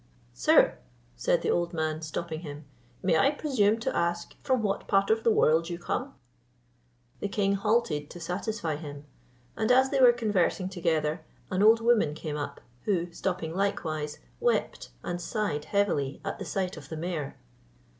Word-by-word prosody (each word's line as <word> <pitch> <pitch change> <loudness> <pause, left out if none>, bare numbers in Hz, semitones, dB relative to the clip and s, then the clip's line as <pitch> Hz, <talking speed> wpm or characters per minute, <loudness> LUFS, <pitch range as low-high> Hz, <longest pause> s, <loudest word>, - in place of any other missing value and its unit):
"Sir," - - +4 0.4
said - - +1
the - - +2
old 175 0 0
man, 155 -1 -1
stopping 160 +1 -4
him, 150 -2 -8 0.4
"may 170 -4 +3
I 275 - +5
presume 260 -8 +2
to - - -1
ask 170 0 -1
from 255 -4 +1
what 195 -2 -1
part 195 +1 +3
of 225 0 +2
the - - +4
world 165 -5 +3
you 170 - -3
come?" 250 +9 -3 1.0
The - - -2
king 200 -1 +1
halted 200 -8 +1
to 175 - -9
satisfy 180 -1 -3
him, 145 -2 -8 0.5
and 220 +2 +1
as 265 +1 +5
they 275 - +1
were 250 -1 +9
conversing 205 -5 0
together, 160 -3 0 0.3
an 185 +1 +1
old 225 +2 +6
woman 225 -10 +3
came 155 -1 -5
up; 145 -1 -5 0.2
who, 175 -4 0
stopping 160 -1 -3
likewise, 155 -6 -2 0.2
wept 480 0 0
and 175 0 -3
sighed 185 -9 -2
heavily 175 -10 0
at - - -4
the - - -5
sight 185 -2 -2
of - - -11
the 160 - -5
mare. 160 -4 -4
175 Hz, 165 wpm, -28 LUFS, 155-215 Hz, 1.0 s, were